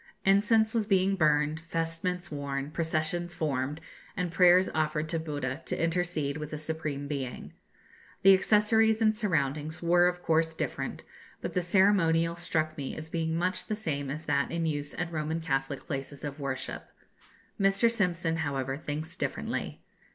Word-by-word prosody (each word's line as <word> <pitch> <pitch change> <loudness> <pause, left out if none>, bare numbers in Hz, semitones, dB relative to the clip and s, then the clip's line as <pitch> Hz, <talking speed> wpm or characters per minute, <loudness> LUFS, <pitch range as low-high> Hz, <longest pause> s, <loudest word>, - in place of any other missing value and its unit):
Incense 220 +3 +4
was 220 -3 0
being 195 -1 +3
burned, 150 -2 +2
vestments 165 +2 -3
worn, 140 -1 -3
processions 165 +2 -1
formed, 145 -2 -1 0.4
and 180 -2 -1
prayers 180 +1 +6
offered 155 0 0
to 165 0 -1
Buddha 145 -3 -4
to - - -2
intercede 165 -4 0
with 150 -1 -5
the 155 - -5
Supreme 155 -2 -3
Being. 135 -4 -5 0.7
The 195 0 +9
accessories 220 +3 +4
and 220 -1 +3
surroundings 155 - -1
were 175 +1 +5
of 180 0 -2
course 160 0 +2
different, - - -3 0.4
but - - -5
the 180 - +1
ceremonial 170 -3 +3
struck 155 -2 -1
me 135 - -4
as 155 0 -7
being 160 -1 -1
much 180 +3 -1
the 215 - -1
same 145 -10 -3
as 155 +3 -5
that 140 0 +1
in 170 -1 -1
use 145 -2 -2
at 175 -1 -3
Roman 160 0 -2
Catholic 135 -3 -2
places 140 -2 -5
of 145 0 -5
worship. 140 -2 -4 0.7
Mr. 195 +3 +4
Simpson, 175 -6 0
however, 135 -3 -2
thinks 155 +2 -4
differently. - - -3
160 Hz, 155 wpm, -29 LUFS, 150-180 Hz, 0.7 s, The